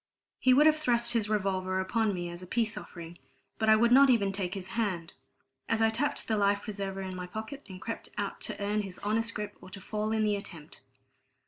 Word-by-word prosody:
And -, -, -64 dB, 0.3 s
he 255 Hz, -, +5 dB
would 295 Hz, +3 st, +6 dB
have 310 Hz, 0 st, +6 dB
thrust 240 Hz, -5 st, +2 dB
his 220 Hz, -3 st, +1 dB
revolver 190 Hz, -3 st, 0 dB
upon 220 Hz, +3 st, +1 dB
me 175 Hz, -2 st, -3 dB
as 175 Hz, +1 st, -8 dB
a 180 Hz, -, -9 dB
peace 225 Hz, +2 st, 0 dB
offering, 170 Hz, 0 st, -9 dB, 0.4 s
but 220 Hz, 0 st, +2 dB
I 220 Hz, -, +8 dB
would 235 Hz, +2 st, +3 dB
not 275 Hz, +2 st, +8 dB
even 205 Hz, -6 st, +3 dB
take 190 Hz, -1 st, -3 dB
his 190 Hz, -1 st, -6 dB
hand, 190 Hz, -7 st, -2 dB, 0.6 s
as 225 Hz, -, +2 dB
I 225 Hz, 0 st, +4 dB
tapped 260 Hz, +6 st, -1 dB
the 220 Hz, -, +1 dB
life 200 Hz, 0 st, +2 dB
preserver 195 Hz, -3 st, -4 dB
in 185 Hz, -1 st, -5 dB
my 180 Hz, 0 st, -5 dB
pocket, 220 Hz, +9 st, -7 dB
and 185 Hz, -1 st, -8 dB
crept 230 Hz, +4 st, -5 dB
out -, -, -3 dB
to -, -, -3 dB
earn 205 Hz, +1 st, 0 dB
his 195 Hz, -3 st, -7 dB
honest 225 Hz, +2 st, 0 dB
grip 210 Hz, -1 st, -4 dB
or 185 Hz, -, -12 dB
to 195 Hz, -, -8 dB
fall 215 Hz, +2 st, -3 dB
in 220 Hz, 0 st, +1 dB
the 210 Hz, -1 st, +2 dB
attempt. 175 Hz, -7 st, -9 dB
210 Hz, 230 wpm, -30 LUFS, 190-225 Hz, 0.6 s, I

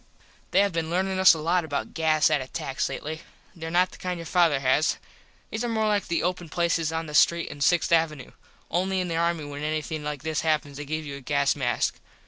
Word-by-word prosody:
They -, -, +4 dB
have 200 Hz, 0 st, +2 dB
been 165 Hz, -1 st, -2 dB
learnin 190 Hz, +2 st, 0 dB
us 190 Hz, -2 st, +8 dB
a -, -, -5 dB
lot 170 Hz, +3 st, +1 dB
about 145 Hz, -3 st, -4 dB
gas 155 Hz, -1 st, +3 dB
at 150 Hz, -3 st, +2 dB
attacks 130 Hz, +1 st, -3 dB
lately. 155 Hz, +2 st, -5 dB, 0.3 s
These 165 Hz, -3 st, -8 dB
are -, -, -3 dB
not 180 Hz, +2 st, +2 dB
the -, -, -14 dB
kind 180 Hz, -1 st, -3 dB
your 165 Hz, -, -7 dB
father 165 Hz, -5 st, +3 dB
has. 135 Hz, +4 st, +2 dB, 0.5 s
These 220 Hz, +2 st, -3 dB
are 240 Hz, -, -1 dB
more 220 Hz, -1 st, 0 dB
like 205 Hz, -1 st, +1 dB
the 170 Hz, -, 0 dB
open 180 Hz, -1 st, -2 dB
places 165 Hz, -1 st, 0 dB
in 160 Hz, 0 st, -2 dB
the 150 Hz, -, -8 dB
street 170 Hz, +2 st, +3 dB
on 150 Hz, -, -9 dB
6th 170 Hz, +5 st, +2 dB
avenoo. 155 Hz, -5 st, +1 dB, 0.4 s
Only 190 Hz, +2 st, 0 dB
in 180 Hz, -1 st, -2 dB
the 165 Hz, -, -1 dB
army 170 Hz, -2 st, 0 dB
when 145 Hz, 0 st, -7 dB
anything 155 Hz, 0 st, -3 dB
like 145 Hz, -2 st, -5 dB
this 160 Hz, -1 st, -1 dB
happens 150 Hz, -3 st, 0 dB
they 145 Hz, -, -6 dB
give 155 Hz, +2 st, -3 dB
you 140 Hz, -1 st, -6 dB
a -, -, -11 dB
gas 140 Hz, +1 st, +1 dB
mask. 125 Hz, -4 st, -1 dB
160 Hz, 235 wpm, -26 LUFS, 150-175 Hz, 0.5 s, us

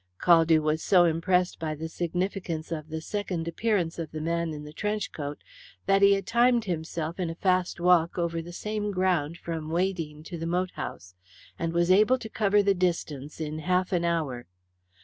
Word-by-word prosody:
Caldew 165 Hz, -2 st, +5 dB
was 155 Hz, +1 st, 0 dB
so 180 Hz, -3 st, +5 dB
impressed 175 Hz, +2 st, +1 dB
by 155 Hz, -1 st, -3 dB
the 160 Hz, +2 st, -5 dB
significance 175 Hz, -1 st, -3 dB
of 155 Hz, -1 st, -4 dB
the 160 Hz, 0 st, -4 dB
second 180 Hz, -3 st, -3 dB
appearance 175 Hz, -2 st, 0 dB
of 165 Hz, -2 st, -4 dB
the 155 Hz, -, -5 dB
man 170 Hz, +1 st, -1 dB
in 150 Hz, -1 st, -6 dB
the 150 Hz, 0 st, -10 dB
trench 210 Hz, +2 st, -2 dB
coat 145 Hz, -1 st, -5 dB, 0.5 s
that 195 Hz, 0 st, +3 dB
he 200 Hz, 0 st, +7 dB
had 195 Hz, -1 st, -1 dB
timed 240 Hz, +1 st, +3 dB
himself 165 Hz, -1 st, -3 dB
in 175 Hz, -2 st, -1 dB
a 165 Hz, -, -5 dB
fast 185 Hz, -1 st, +1 dB
walk 175 Hz, -1 st, +3 dB
over 170 Hz, -1 st, -1 dB
the 170 Hz, +1 st, -9 dB
same 210 Hz, +3 st, -3 dB
ground 180 Hz, -5 st, 0 dB
from 160 Hz, -2 st, -5 dB
Weydene 165 Hz, -3 st, -2 dB
to 170 Hz, +1 st, -7 dB
the 165 Hz, -, -3 dB
moat 180 Hz, +2 st, 0 dB
house, 90 Hz, 0 st, -7 dB, 0.5 s
and 165 Hz, 0 st, -1 dB
was 170 Hz, +1 st, +2 dB
able 215 Hz, +7 st, +5 dB
to 230 Hz, -3 st, -8 dB
cover 205 Hz, -1 st, +2 dB
the 200 Hz, 0 st, +4 dB
distance 165 Hz, -6 st, -2 dB
in 155 Hz, 0 st, -4 dB
half 180 Hz, +4 st, 0 dB
an 175 Hz, -1 st, +1 dB
hour. 155 Hz, -8 st, -1 dB
170 Hz, 190 wpm, -27 LUFS, 160-190 Hz, 0.5 s, he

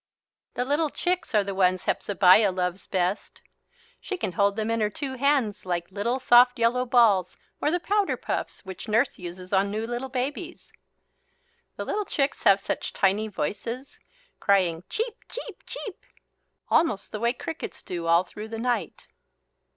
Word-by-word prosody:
The 245 Hz, -, -1 dB
little 295 Hz, +3 st, +1 dB
chicks 355 Hz, -6 st, -2 dB
are 210 Hz, -, +5 dB
the 200 Hz, 0 st, -4 dB
ones 185 Hz, -1 st, +2 dB
Hepzebiah 195 Hz, +1 st, +4 dB
loves 180 Hz, 0 st, -3 dB
best. 185 Hz, +1 st, -1 dB, 0.6 s
She 380 Hz, -, -4 dB
can 210 Hz, -, -2 dB
hold 200 Hz, +2 st, +2 dB
them 220 Hz, +1 st, -1 dB
in 230 Hz, -1 st, 0 dB
her 210 Hz, -, +2 dB
two 270 Hz, +5 st, -4 dB
hands 260 Hz, -6 st, +1 dB
like 175 Hz, -1 st, -3 dB
little 230 Hz, +7 st, -1 dB
soft 245 Hz, 0 st, +6 dB
yellow 245 Hz, +2 st, +2 dB
balls 215 Hz, -7 st, +4 dB, 0.2 s
or -, -, +2 dB
the 350 Hz, +3 st, +1 dB
powder 405 Hz, +2 st, +1 dB
puffs -, -, -4 dB
which 190 Hz, +4 st, -8 dB
Nurse 220 Hz, +2 st, +1 dB
uses 180 Hz, +1 st, -8 dB
on 195 Hz, +1 st, +3 dB
new 215 Hz, +2 st, -2 dB
little 240 Hz, +3 st, -4 dB
babies. 285 Hz, +7 st, -4 dB, 1.0 s
The -, -, -5 dB
little 420 Hz, 0 st, -1 dB
chicks 275 Hz, -5 st, -1 dB
have 200 Hz, -1 st, +6 dB
such -, -, -4 dB
tiny 200 Hz, +3 st, +2 dB
voices, 230 Hz, -, -5 dB, 0.4 s
crying 180 Hz, -4 st, +2 dB
"cheep, 460 Hz, +1 st, -3 dB
cheep, -, -, -8 dB
cheep," 425 Hz, -7 st, -7 dB, 0.6 s
almost 210 Hz, -, +1 dB
the 210 Hz, -, -4 dB
way 235 Hz, +2 st, +2 dB
the -, -, -28 dB
crickets 325 Hz, -, -6 dB
do 170 Hz, -2 st, -4 dB
all 170 Hz, +2 st, +5 dB
through 210 Hz, +4 st, -9 dB
the 225 Hz, 0 st, -6 dB
night. 240 Hz, +1 st, -2 dB
220 Hz, 165 wpm, -26 LUFS, 190-260 Hz, 1.0 s, soft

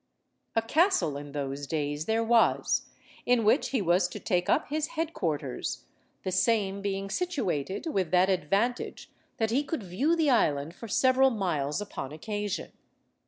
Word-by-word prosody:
A 225 Hz, -, +2 dB
castle 315 Hz, -, +2 dB
in 145 Hz, 0 st, -7 dB
those 140 Hz, 0 st, -4 dB
days 145 Hz, 0 st, -2 dB
there 225 Hz, +3 st, +1 dB
was, 230 Hz, 0 st, +3 dB, 0.4 s
in 245 Hz, -2 st, +3 dB
which 220 Hz, +8 st, +3 dB
he 255 Hz, -7 st, 0 dB
was 175 Hz, +1 st, +3 dB
to -, -, -8 dB
take 180 Hz, -4 st, 0 dB
up -, -, +2 dB
his 305 Hz, +1 st, -1 dB
head–quarters, 160 Hz, -, -2 dB, 0.4 s
the 185 Hz, -, -2 dB
same 195 Hz, +1 st, +1 dB
being 195 Hz, 0 st, -2 dB
situated 205 Hz, -, -2 dB
with 195 Hz, -, 0 dB
that 180 Hz, +2 st, +4 dB
advantage 195 Hz, +6 st, -1 dB, 0.3 s
that 220 Hz, -1 st, 0 dB
he 270 Hz, +5 st, +2 dB
could 290 Hz, -5 st, -4 dB
view 250 Hz, -, +1 dB
the 315 Hz, -4 st, +3 dB
island 150 Hz, -, +2 dB
for 230 Hz, -, -9 dB
several 260 Hz, +4 st, +4 dB
miles 175 Hz, -, -1 dB
upon 140 Hz, -9 st, -6 dB
occasion. 205 Hz, +5 st, -4 dB
200 Hz, 155 wpm, -28 LUFS, 165-245 Hz, 0.4 s, that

